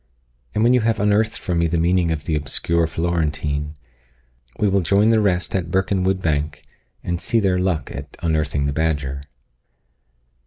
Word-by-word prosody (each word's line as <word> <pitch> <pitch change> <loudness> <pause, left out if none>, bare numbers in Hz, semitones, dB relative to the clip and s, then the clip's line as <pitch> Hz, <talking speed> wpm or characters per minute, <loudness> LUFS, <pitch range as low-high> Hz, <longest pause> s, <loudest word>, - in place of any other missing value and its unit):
and 110 - +2
when 120 +2 +5
you 125 - +5
have 115 -1 +1
unearthed 105 +2 +2
for 90 - -3
me 85 0 +2
the 85 +1 0
meaning 85 +1 +2
of 75 -3 -2
the 80 - -1
obscure 80 +3 0
Florentine, 75 -3 -2 0.8
we 105 - +2
will 100 0 +2
join 100 +6 +3
the 110 - +4
rest 95 -4 0
at 90 -3 -1
Birkenwood 95 0 0
bank, 75 -2 -1 0.4
and 85 -1 -2
see 115 - +1
their 95 -3 +1
luck 90 -4 -1
at 70 +1 -8
unearthing 75 -3 0
the 70 - -1
badger." 70 -3 -1
85 Hz, 165 wpm, -21 LUFS, 75-95 Hz, 0.8 s, when